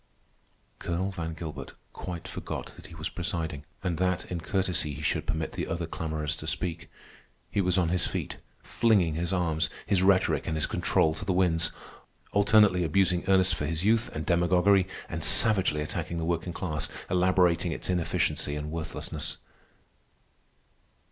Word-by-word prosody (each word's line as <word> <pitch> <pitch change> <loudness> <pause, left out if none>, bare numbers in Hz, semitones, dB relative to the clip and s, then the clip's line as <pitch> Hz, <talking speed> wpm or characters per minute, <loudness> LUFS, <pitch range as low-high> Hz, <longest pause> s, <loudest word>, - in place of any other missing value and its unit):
Colonel 90 +3 -2
Van 80 -4 -5
Gilbert 80 -2 -7 0.2
quite 85 -2 -6
forgot - - -6
that - - -13
he 85 - -12
was 80 0 -4
presiding, 80 -5 -4 0.2
and 85 -4 -1
that 95 0 0
in 85 -2 -3
courtesy 90 -6 -1
he 75 - -7
should - - 0
permit 80 0 -2
the - - -4
other 85 0 -2
clamorers 80 -2 -3
to - - -7
speak. 85 -3 -2 0.6
He 100 - +1
was 90 -1 +1
on 85 -3 +2
his 90 0 +1
feet, - - -4 0.3
flinging 100 -9 +2
his 85 +3 -2
arms, 80 -5 +1 0.2
his 95 -3 +2
rhetoric, 95 0 +3
and 80 - -1
his 80 - +1
control 80 - +1
to 80 - -7
the 95 - -1
winds, 85 -2 +2 0.6
alternately 100 -3 +4
abusing 90 +2 +2
Ernest 95 -2 +4
for 75 -2 -2
his 80 +3 -2
youth 115 +2 +3
and 80 0 -3
demagoguery, 90 +2 +3 0.2
and - - -4
savagely 95 -8 +4
attacking 80 +2 -3
the 80 - -2
working 85 +1 -1
class, 80 -3 -2 0.2
elaborating 90 -1 +2
its - - -3
inefficiency 85 -4 0
and 75 +1 -5
worthlessness. 80 -1 -4
85 Hz, 160 wpm, -28 LUFS, 80-95 Hz, 0.6 s, alternately